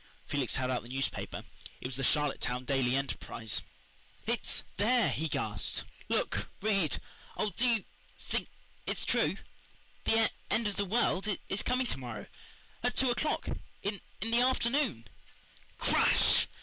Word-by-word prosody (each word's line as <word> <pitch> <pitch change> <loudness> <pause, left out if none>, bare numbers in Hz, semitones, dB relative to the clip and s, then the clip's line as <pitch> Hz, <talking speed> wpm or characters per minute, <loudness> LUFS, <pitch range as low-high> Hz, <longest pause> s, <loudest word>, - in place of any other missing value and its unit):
Felix 140 -4 +1
held 130 -1 0
out 125 - 0
the 120 - -12
newspaper 135 +1 -2 0.4
it - - -9
was 125 0 -3
the 135 - -3
Charlottetown 130 -3 +1
Daily 130 -2 +2
Enterprise. 125 -5 -2 0.6
"It's - - 0
there," 235 +3 +4
he 160 - -1
gasped. 105 - -1 0.3
"Look - - 0
read 195 -7 +2 0.4
oh, 210 - +1
do 250 - +3
you 230 -5 +3 0.3
think - - -2 0.4
it's - - 0
true? - - +2 0.7
The 225 0 +4 0.2
end 225 -1 +2
of 205 - -2
the 205 - +1
world 200 -2 +2 0.2
is 195 - +2
coming 255 +1 +1
to 185 - -1
morrow 120 -5 -6 0.6
at 245 +1 +1
two 260 -2 +4
o'clock 300 +5 0 0.4
in 200 -1 -2 0.2
the 230 +3 +3
afternoon!" 250 - +2 0.7
Crash! - - +4
195 Hz, 140 wpm, -32 LUFS, -, 0.7 s, there